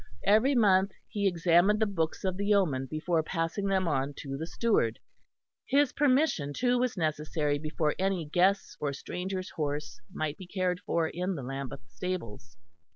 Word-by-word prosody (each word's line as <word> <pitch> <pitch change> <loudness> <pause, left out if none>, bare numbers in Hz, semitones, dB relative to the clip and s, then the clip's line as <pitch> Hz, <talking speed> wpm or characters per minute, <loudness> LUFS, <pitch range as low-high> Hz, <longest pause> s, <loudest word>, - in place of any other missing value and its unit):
Every 220 +8 +4
month 195 -4 +4
he 200 -1 0
examined 175 +3 +3
the 220 - +3
books 165 -6 -2
of 190 -1 0
the 200 +1 -2
yeoman 165 -11 +2
before 160 +3 0
passing 165 +4 -2
them 190 -2 +1
on 140 -1 -1
to 135 -2 -5
the 160 +4 -4
steward. 175 - +1 0.7
His 280 -1 +3
permission 265 - +2
too 245 - +2
was 250 -4 0
necessary 150 -2 0
before 155 0 -1
any 190 -3 0
guest's 185 +6 +2
or 145 -1 -1
stranger's 185 +6 -5
horse 145 -6 -4
might 155 -1 -3
be 185 - -10
cared 180 -1 -1
for 165 -2 0
in 180 +3 -2
the 140 - -5
Lambeth 135 -2 -6
stables. 115 - -6
175 Hz, 160 wpm, -29 LUFS, 150-195 Hz, 0.7 s, Every